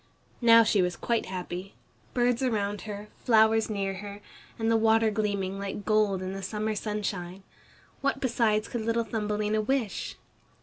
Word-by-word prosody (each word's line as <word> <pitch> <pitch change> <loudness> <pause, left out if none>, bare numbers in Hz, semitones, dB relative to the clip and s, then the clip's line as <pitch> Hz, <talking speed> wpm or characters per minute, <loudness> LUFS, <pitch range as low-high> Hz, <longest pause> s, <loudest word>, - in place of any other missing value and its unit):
Now 230 -1 +8
she 210 -3 +3
was 180 -1 0
quite 235 -1 -1
happy! 185 +1 -6 0.4
Birds 245 0 +2
around 210 -5 -1
her, 205 0 -6 0.2
flowers 220 -1 +4
near 195 -2 -1
her, 200 +1 -8 0.4
and 225 0 0
the - - +4
water 225 0 +4
gleaming 200 -2 -1
like 200 0 -5
gold 210 -3 +2
in 185 +1 -4
the 195 - -5
summer 210 +3 -2
sunshine. 200 -3 -4 0.6
What 280 - 0
besides 225 -4 +1
could 240 - -3
little 230 +1 0
Thumbelina 210 -1 -1
wish? 235 -2 -2
215 Hz, 150 wpm, -28 LUFS, 200-225 Hz, 0.6 s, Now